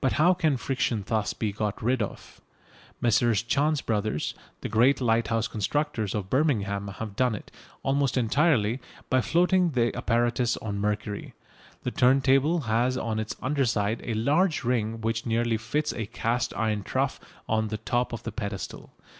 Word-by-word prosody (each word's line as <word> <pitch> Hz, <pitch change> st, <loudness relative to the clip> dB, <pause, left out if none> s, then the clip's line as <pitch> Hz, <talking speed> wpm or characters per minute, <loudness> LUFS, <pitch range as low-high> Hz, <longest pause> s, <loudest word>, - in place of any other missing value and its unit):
But 130 Hz, -, +2 dB
how 170 Hz, +5 st, +5 dB
can 160 Hz, -6 st, +1 dB
friction 120 Hz, -4 st, -1 dB
thus 110 Hz, -1 st, 0 dB
be 110 Hz, -2 st, -1 dB
got 105 Hz, 0 st, -3 dB
rid 125 Hz, +2 st, +1 dB
of? 105 Hz, -, -6 dB, 0.6 s
Messrs 115 Hz, -2 st, +3 dB
Chance 145 Hz, +5 st, +1 dB
Bros., 105 Hz, -7 st, -1 dB, 0.3 s
the -, -, -3 dB
great 120 Hz, +6 st, +4 dB
lighthouse 115 Hz, -2 st, +1 dB
constructors, 115 Hz, -1 st, -1 dB
of 100 Hz, -3 st, -2 dB
Birmingham, 100 Hz, -7 st, +1 dB
have 100 Hz, +1 st, -6 dB
done 125 Hz, -3 st, +2 dB
it, -, -, -10 dB, 0.3 s
almost 135 Hz, -1 st, +1 dB
entirely, 125 Hz, -2 st, +2 dB, 0.3 s
by 130 Hz, -, +4 dB
floating 180 Hz, +4 st, +3 dB
the 120 Hz, -2 st, +1 dB
apparatus 120 Hz, 0 st, +1 dB
on 100 Hz, -2 st, -4 dB
mercury. 105 Hz, 0 st, -3 dB, 0.5 s
The -, -, -2 dB
turntable 135 Hz, +5 st, +3 dB
has 120 Hz, +1 st, +1 dB
on 110 Hz, -3 st, -2 dB
its 110 Hz, 0 st, -3 dB
under 140 Hz, +1 st, +1 dB
side 110 Hz, -2 st, 0 dB
a 115 Hz, -, -2 dB
large 150 Hz, -, +2 dB
ring 115 Hz, -2 st, 0 dB
which 115 Hz, +1 st, -1 dB
nearly 115 Hz, 0 st, +1 dB
fits 145 Hz, +8 st, -1 dB
a 110 Hz, -3 st, -4 dB
cast 115 Hz, +2 st, -1 dB
iron 110 Hz, -2 st, 0 dB
trough -, -, -1 dB, 0.3 s
on 110 Hz, 0 st, +1 dB
the 110 Hz, 0 st, -3 dB
top 120 Hz, +3 st, -1 dB
of 115 Hz, -, -6 dB
the 115 Hz, -, -4 dB
pedestal. 100 Hz, -4 st, -6 dB
115 Hz, 165 wpm, -27 LUFS, 110-135 Hz, 0.6 s, how